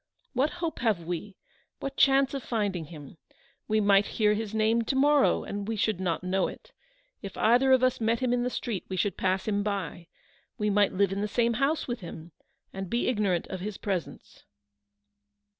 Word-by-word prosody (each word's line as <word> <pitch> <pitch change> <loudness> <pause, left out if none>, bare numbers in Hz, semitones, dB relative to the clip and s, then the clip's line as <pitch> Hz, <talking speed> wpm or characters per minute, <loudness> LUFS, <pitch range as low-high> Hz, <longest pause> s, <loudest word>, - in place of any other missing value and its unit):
What 270 +3 +2 0.2
hope 320 - -4
have 215 -8 +1
we? 180 +3 -5 0.4
what 275 0 -5
chance 270 0 +4
of 275 - -3
finding 205 -8 -2
him? 150 0 -11 0.5
We 215 0 +2
might 200 -1 +4
hear 210 -1 +4
his 210 -1 -3
name 220 +1 +2
to 265 - -1
morrow, 285 +1 +4
and 200 0 -5
we 225 - -1
should 215 -2 0
not 175 -3 -1
know 185 +1 +1
it. - - -11 0.5
If 195 - -8
either 250 +4 +4
of 260 -1 +5
us 255 -2 +2
met 225 +1 +2
him 250 -2 +1
in 245 - +1
the 250 - 0
street, 230 -5 -3
we 190 - -3
should 205 +1 0
pass 190 +1 0
him 205 -1 +1
by. 195 -5 -3 0.5
We 210 0 0
might 205 0 +3
live 195 0 +1
in 195 +1 -2
the 210 - 0
same 235 +2 +1
house 275 +7 0
with 240 -1 -3
him, 170 -2 -9 0.4
and 195 -1 -5
be 235 +1 0
ignorant 200 -7 0
of 190 - -5
his 205 +2 -5
presence." 190 -6 -5
210 Hz, 195 wpm, -28 LUFS, 190-245 Hz, 0.5 s, of